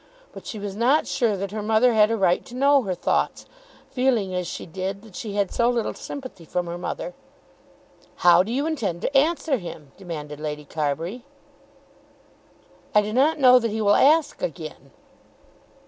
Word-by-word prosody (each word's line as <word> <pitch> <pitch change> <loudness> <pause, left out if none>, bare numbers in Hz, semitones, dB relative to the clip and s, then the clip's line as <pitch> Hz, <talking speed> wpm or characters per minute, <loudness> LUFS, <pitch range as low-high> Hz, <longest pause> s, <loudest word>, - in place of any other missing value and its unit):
But - - -11
she 220 - -5
was 200 -1 -5
not 255 +8 +3
sure 230 -6 0
that 195 0 -4
her 215 0 -4
mother 220 +3 +3
had 215 -1 +5
a 225 - 0
right 180 -3 +2
to 245 - -10
know 280 +2 +4
her 190 -6 -3
thoughts, - - -1 0.5
feeling 245 -7 +1
as 180 -1 -2
she - - -6
did 190 +3 -5
that 215 -5 -15
she 215 -4 -5
had 200 -2 0
so 235 0 +2
little 235 -2 -1
sympathy 260 -11 -8
from 175 +2 -2
her 170 0 -5
mother. - - -5 1.1
"How 175 0 +8
do 205 +5 -3
you 275 +4 0
intend 220 - -2
to 275 - -2
answer 305 0 +2
him?" 160 - -9
demanded 150 -6 -7
Lady 150 -1 -5
Carbury. 160 - -3 1.7
"I 210 - +6
do 210 +1 -4
not 285 +7 +3
know 255 -3 +7
that 230 -1 -1
he 220 +1 -3
will 205 -1 +4
ask 310 +6 +3
again." - - -6
215 Hz, 180 wpm, -24 LUFS, 180-255 Hz, 1.7 s, How